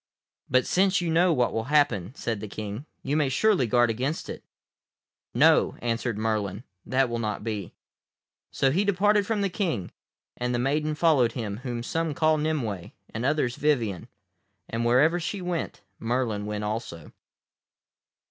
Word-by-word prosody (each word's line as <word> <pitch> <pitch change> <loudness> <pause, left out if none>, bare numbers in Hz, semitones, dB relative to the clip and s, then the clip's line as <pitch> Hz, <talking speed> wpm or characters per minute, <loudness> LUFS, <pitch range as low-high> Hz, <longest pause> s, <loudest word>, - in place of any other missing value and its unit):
"But 130 0 +3
since 190 +1 +3
you 175 -2 -1
know 175 +2 +4
what 125 -6 +1
will 110 0 -2
happen," 130 - +1
said 115 -7 -3
the 110 - -6
King, 105 +7 -6 0.2
"you 140 +2 -1
may 150 -3 +2
surely 180 - +2
guard 120 0 +3
against 130 +8 -3
it." - - -7 0.9
"No," - - +4
answered 115 -1 -2
Merlin, 105 -1 -2 0.2
"that 135 0 +2
will 120 -1 -3
not 105 -2 -3
be." 105 -5 -4 0.7
So 135 - +1
he 185 +8 +2
departed 205 +1 +2
from 220 -2 0
the 200 - +2
King, 165 - -2 0.4
and 125 0 -2
the - - +1
maiden 150 +5 0
followed 145 -8 +3
him 105 -5 -4
whom 120 -1 -4
some 160 +3 -2
call 155 0 +3
Nimue 120 - -2 0.2
and 110 - -3
others 135 -3 0
Vivien, 115 - 0 0.6
and 115 +1 -2
wherever 145 +9 +4
she 185 +4 -3
went 180 -2 -3 0.2
Merlin 115 -3 -1
went 105 0 -3
also. 105 -7 -5
125 Hz, 155 wpm, -26 LUFS, 110-155 Hz, 0.9 s, know